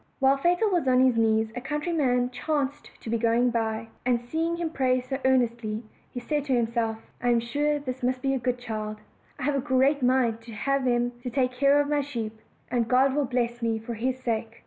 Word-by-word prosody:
While 270 0 +4
Fatal 350 +8 +2
was 345 -7 +1
on 255 -1 +4
his 255 -2 +3
knees 220 -1 +2
a 245 - -4
countryman 275 -4 0
chanced 290 +1 -2
to - - -7
be 230 - +1
going 235 +2 +2
by; 225 -1 -2
and 245 -1 +2
seeing 320 +8 -2
him 335 -2 -2
pray 255 -3 +2
so 255 +2 -4
earnestly, 235 -4 +1 0.4
said 295 +4 -1
to 270 - 0
himself, 230 -1 0 0.2
"I 245 - +1
am 240 -1 +4
sure 290 +6 0
this 260 -3 -5
must 255 +1 -1
be 270 0 +1
a 265 - 0
good 250 0 -1
child; 215 -3 -5 0.4
I 275 - -6
have 290 +2 +1
a - - +1
great 275 +1 +2
mind 245 -3 +2
to 230 0 -11
have 275 +4 0
him 240 0 +1
to 250 - -4
take 250 0 +1
care 275 +3 +3
of 290 - +1
my 295 0 +1
sheep, 235 -6 -4 0.4
and 235 -2 +1
God 260 +3 +4
will 290 0 +1
bless 240 -1 -1
me 225 -1 0
for 225 +2 -6
his 250 +3 -1
sake." 230 -2 -3
250 Hz, 215 wpm, -26 LUFS, 235-275 Hz, 0.4 s, While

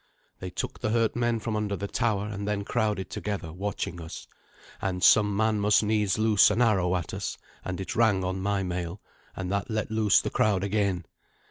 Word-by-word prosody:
They 95 - -5
took - - -5
the 110 - -1
hurt 115 0 +1
men 120 -1 +1
from 110 0 -3
under 105 -1 -1
the 100 +1 -4
tower, 105 -2 0
and 100 -1 -5
then 105 -1 -1
crowded 105 -4 -1
together, 95 -6 -4
watching 90 -2 -4
us. 80 - -8 0.6
And 90 -2 -2
some 105 -2 +5
man 110 -1 +2
must 105 +1 +4
needs 105 -2 +1
loose 110 -1 +5
an 105 +2 0
arrow 95 -7 +3
at 85 -4 -3
us, - - -4 0.3
and 90 0 -4
it 95 - -4
rang 105 -5 +3
on 95 +1 -2
my 100 0 0
mail, 90 +1 -4 0.4
and 95 -1 -4
that 100 +3 -1
let 110 -1 -2
loose 110 -2 +4
the - - -3
crowd 100 -3 +2
again. 100 -3 0
100 Hz, 200 wpm, -27 LUFS, 95-110 Hz, 0.6 s, some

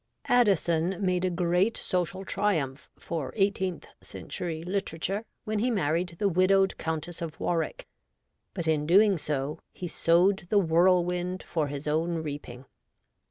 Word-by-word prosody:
Addison 190 - +2
made 185 -2 0
a 185 - +2
great 180 +5 +1
social 185 +1 -2
triumph 160 -10 -1
for 145 -6 -4
eighteenth 190 -3 0 0.2
century 165 -3 -6
literature 195 +2 -2 0.2
when 215 0 -2
he 245 +4 +1
married 175 -4 0
the 205 - +1
widowed 190 +1 +3
Countess 160 +1 -3
of 165 -2 -6
Warwick, 165 -3 -2 0.7
but 165 - -3
in 150 -2 +1
doing 195 +1 +5
so 150 +1 -3
he 180 - -6
sowed 175 +3 +2
the 210 - +3
whirlwind 180 0 +2
for 155 -3 -1
his 145 +1 -6
own 165 +3 0
reaping. 145 -5 -6
175 Hz, 135 wpm, -28 LUFS, 160-190 Hz, 0.7 s, doing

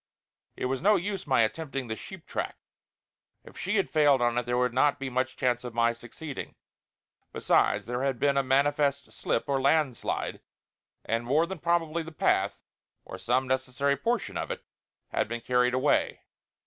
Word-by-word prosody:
It - - -3
was 130 +1 -1
no 210 +4 +5
use 195 +1 -3
my 115 - +4
attempting 135 +2 -3
the 110 - -3
sheep 185 +8 -10
track; - - -3 0.9
if - - -15
she 190 +4 -2
had 195 - +1
failed 145 -3 +4
on 120 -1 +1
it 120 -1 -1
there 120 0 +1
would 125 -1 +1
not 145 +3 +3
be 135 -1 -4
much 130 +1 -1
chance 125 -2 +1
of 120 -2 -7
my 115 0 +3
succeeding. 125 +5 -8 0.8
Besides, - - +2
there 120 +1 -3
had 135 -2 0
been 140 +2 +2
a 140 - +4
manifest 140 +1 +1
slip - - -1
or 135 -1 +1
landslide; 140 -2 0 0.6
and 115 +1 0
more 145 +7 +2
than 185 0 -6
probably 170 0 0
the 165 0 -8
path, 155 - +1 0.5
or - - -8
some 130 +2 +1
necessary 130 +2 0
portion 235 +6 -1
of - - -3
it, - - -5 0.5
had - - 0
been 120 +2 -4
carried 125 +1 +2
away. 135 +3 +1
135 Hz, 175 wpm, -28 LUFS, 125-155 Hz, 0.9 s, no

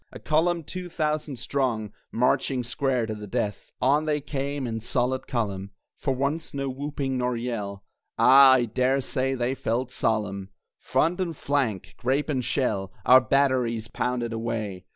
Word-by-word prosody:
A - - -9
column 165 +2 +1
two 180 +3 -6
thousand 155 -3 -1
strong 120 -4 -1 0.2
Marching 125 +1 +1
square 125 0 0
to 110 - -4
the 105 -1 -8
death! 105 -2 -3
On 145 +4 +3
they 150 -1 +1
came 140 -1 -3
in 115 -2 -3
solid 125 +2 -1
column, 100 -6 -2 0.3
For 135 - -1
once 140 +4 -2
no 140 -1 -2
whooping 135 -1 -3
nor 125 -1 0
yell 105 -5 -4 0.3
(Ah, 135 +1 +8
I 125 -2 +3
dare 130 +4 +1
say 135 +1 -1
they 125 +1 0
felt 125 0 -2
solemn!) 100 -5 -1 0.3
Front 175 +4 +1
and 170 -5 -3
flank, 130 -9 -1
grape 135 +5 0
and 130 -4 0
shell, 105 -8 -1
Our 130 +1 +8
batteries 125 -5 +1
pounded 120 -2 -2
away! 110 -5 -3
130 Hz, 155 wpm, -26 LUFS, 115-140 Hz, 0.3 s, Ah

